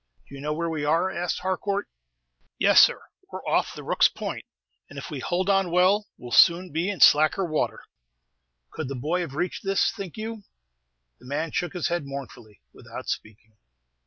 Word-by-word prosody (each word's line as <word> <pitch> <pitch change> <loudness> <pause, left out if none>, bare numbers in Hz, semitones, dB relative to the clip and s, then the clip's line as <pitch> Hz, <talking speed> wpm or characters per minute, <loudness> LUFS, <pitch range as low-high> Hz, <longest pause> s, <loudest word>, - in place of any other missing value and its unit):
"Do - - -16
you 135 - -8
know 150 +1 -2
where 170 +2 -2
we 160 -3 -3
are?" 165 +5 +1
asked 175 0 -3
Harcourt. 200 +2 -2 0.7
"Yes, - - +5
sir; - - +3 0.3
we - - -5
're - - -11
off - - +1
the - - -8
Rooks' - - +4
Point, - - -6 0.4
and 145 - -12
if 140 - -7
we 145 - -4
hold 180 +7 -1
on 195 -2 +2
well, 185 +4 +3
we - - -14
'll 120 - -8
soon 175 +5 +5
be 165 +6 -1
in 200 - -4
slacker 155 +6 +5
water." 155 -3 -2 0.9
"Could 155 - -5
the 140 - -5
boy 155 +8 -1
have 150 -6 -6
reached 180 +4 -3
this, 195 0 +2
think 195 -5 -8
you?" 220 0 -5 0.8
The 125 - -15
man 150 +4 -2
shook 175 +5 -2
his 180 -2 -2
head 170 -4 -2
mournfully, 120 - -9
without - - -9
speaking. 110 0 -7
170 Hz, 190 wpm, -25 LUFS, 145-185 Hz, 0.9 s, Yes